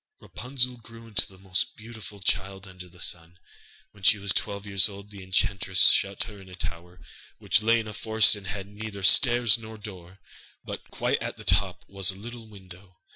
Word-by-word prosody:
Rapunzel 125 0 -3
grew 115 0 -14
into 105 -3 -1
the 95 - -17
most 95 -1 -2
beautiful 110 -2 -11
child 95 +1 -2
under 90 -1 -12
the 90 +1 -19
sun. 85 0 -3 0.5
When 105 - -19
she 105 +2 +5
was 100 -1 0
twelve 100 0 -2
years 100 0 +3
old, 100 +1 -11
the 100 -1 -10
enchantress 95 0 +3
shut 100 0 +1
her 105 -2 -10
into 95 -1 -13
a - - -8
tower, 90 +1 -7 0.4
which 105 - +2
lay 115 +2 +4
in 110 - -5
a 105 - -7
forest, 110 0 +4
and 100 -2 -10
had 100 -1 -5
neither 105 0 -8
stairs 120 +2 +6
nor 110 -1 -10
door, 95 -3 -11 0.5
but - - -7
quite - - -1
at - - -4
the - - -11
top 90 +1 +1
was 95 -1 0
a 95 - -1
little 115 +3 -9
window. 95 -2 -15
100 Hz, 195 wpm, -27 LUFS, 95-110 Hz, 0.5 s, stairs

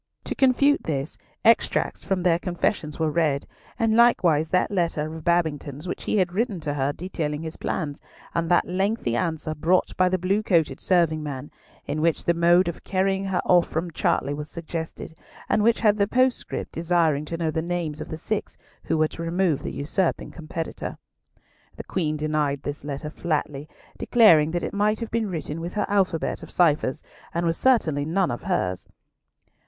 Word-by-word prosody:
To - - -3
confute 275 +2 +3
this, 140 -1 -2 0.3
extracts 230 0 +2
from 190 -3 -1
their 170 -2 +3
confessions 175 -3 -2
were 160 -1 0
read, 150 -4 +1 0.3
and 225 -1 +2
likewise 170 -10 +4
that 180 +3 +1
letter 165 -4 -1
of 160 - -8
Babington's 155 -3 0
which - - -5
he - - +1
had 180 -3 +1
written 210 -2 -1
to 150 -1 -2
her 140 0 0
detailing 155 -3 -4
his 160 0 -5
plans, 145 -5 -3 0.3
and 165 -1 -1
that 175 - +3
lengthy 190 - 0
answer, 160 0 -2
brought 170 +4 +1
by 185 0 +4
the 185 - +1
blue 190 +4 +1
coated 165 -9 +1
serving 170 -4 +2
man, 145 -2 -6 0.3
in 155 - -2
which 165 0 +1
the 170 - +3
mode 175 +2 +4
of 170 - -5
carrying 195 0 0
her 190 -2 -1
off 175 -2 +4
from 170 +2 -2
Chartley 145 -2 0
was 150 +1 -6
suggested, 160 -1 -6 0.3
and 215 - +2
which 230 +2 +3
had 210 -2 +4
the 200 -1 +2
postscript 255 +2 0
desiring 165 -3 +1
to 165 +2 -4
know 165 -2 -1
the 160 - -1
names 170 -3 -3
of - - -7
the 160 - -5
six 215 +6 -4 0.3
who - - 0
were 155 0 +2
to - - -8
remove 170 -2 +1
the - - -4
usurping 165 +5 -1
competitor. 165 0 -6 0.8
The - - -6
Queen 155 -5 -1
denied 150 -2 -1
this 145 +1 -5
letter 145 +1 -5
flatly, 150 -3 -3 0.3
declaring 170 -11 +5
that 175 +1 -2
it - - -3
might 210 +1 +1
have 230 -2 -5
been 225 -2 0
written 165 -2 -4
with 170 +4 -6
her 210 - +1
alphabet 190 -5 0
of - - -10
ciphers, 155 -4 +2 0.3
but 170 - 0
was 165 -1 0
certainly 165 - +2
none 175 +3 +1
of - - -4
hers. 95 - -2
170 Hz, 185 wpm, -24 LUFS, 155-185 Hz, 0.8 s, declaring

